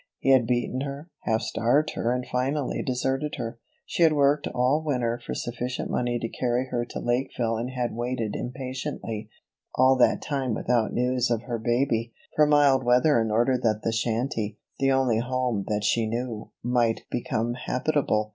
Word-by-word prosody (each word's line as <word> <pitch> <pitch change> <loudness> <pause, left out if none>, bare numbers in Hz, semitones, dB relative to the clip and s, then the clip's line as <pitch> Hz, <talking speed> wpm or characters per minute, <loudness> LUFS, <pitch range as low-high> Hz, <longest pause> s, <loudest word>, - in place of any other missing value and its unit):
He 135 - +2
had 130 -3 +5
beaten 125 +1 0
her, 140 +4 -6
half 110 0 +1
starved 140 +7 +1
her 115 - -1
and 125 0 -1
finally 135 +2 -1
deserted 135 +3 -1
her. 115 +1 -5 0.3
She - - -3
had 160 -2 +6
worked 145 0 +3
all 130 +5 +1
winter 120 -5 -1
for - - -4
sufficient 125 +1 -3
money 120 -1 0
to 115 - -3
carry 125 +2 -1
her 120 0 0
to - - -6
Lakeville 120 -2 0
and 120 +3 -3
had 125 -2 -2
waited 120 -2 -2
impatiently 130 -3 -5 0.5
all 130 +1 +5
that 125 - +4
time 135 -6 -1
without 120 -3 +1
news 125 0 +1
of 115 -1 0
her 120 -2 -3
baby 120 -1 0 0.2
for 150 -1 +5
mild 145 -3 +5
weather 125 +2 +4
in 110 - -1
order 120 +4 +2
that 110 -3 +1
the 115 - +1
shanty, 115 -1 -1 0.2
the 135 0 +3
only 130 -4 +2
home 125 -4 -1
that 105 -1 -1
she 110 +1 +2
knew, 115 -1 -4
might 120 -2 +1
become 120 -1 -1
habitable. 125 -4 0
125 Hz, 175 wpm, -26 LUFS, 115-130 Hz, 0.5 s, had